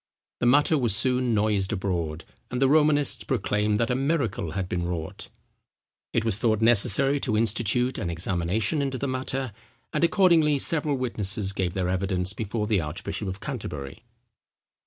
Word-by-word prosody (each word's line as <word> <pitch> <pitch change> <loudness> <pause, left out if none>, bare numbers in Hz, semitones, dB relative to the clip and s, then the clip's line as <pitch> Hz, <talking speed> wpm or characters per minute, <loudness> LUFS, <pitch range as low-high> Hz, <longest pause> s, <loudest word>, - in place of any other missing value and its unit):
The 120 - +1
matter 145 +4 +4
was 115 -6 +3
soon 125 0 +2
noised 105 -2 +1
abroad, 85 -6 -3 0.2
and 125 - -3
the 135 - +4
Romanists 145 -5 +3
proclaimed 105 -2 0
that 115 +2 0
a - - +1
miracle 135 - -1
had 95 -2 -3
been 90 -1 -2
wrought. 85 -3 -5 0.8
It 115 - 0
was 110 -2 +1
thought 110 -3 +1
necessary 120 +5 +3
to 110 -5 -1
institute 120 +3 +1
an 95 -6 -3
examination 90 - -1
into 135 -2 -2
the 140 - -3
matter; 130 -2 -3 0.4
and - - 0
accordingly 170 -5 +4
several 150 0 +2
witnesses 105 -5 0
gave 90 -2 -2
their 95 -2 -1
evidence 95 0 -1
before 105 0 -3
the 105 -4 +1
archbishop 80 +6 -5
of 95 +2 -6
Canterbury. 75 - -6
110 Hz, 155 wpm, -25 LUFS, 95-130 Hz, 0.8 s, matter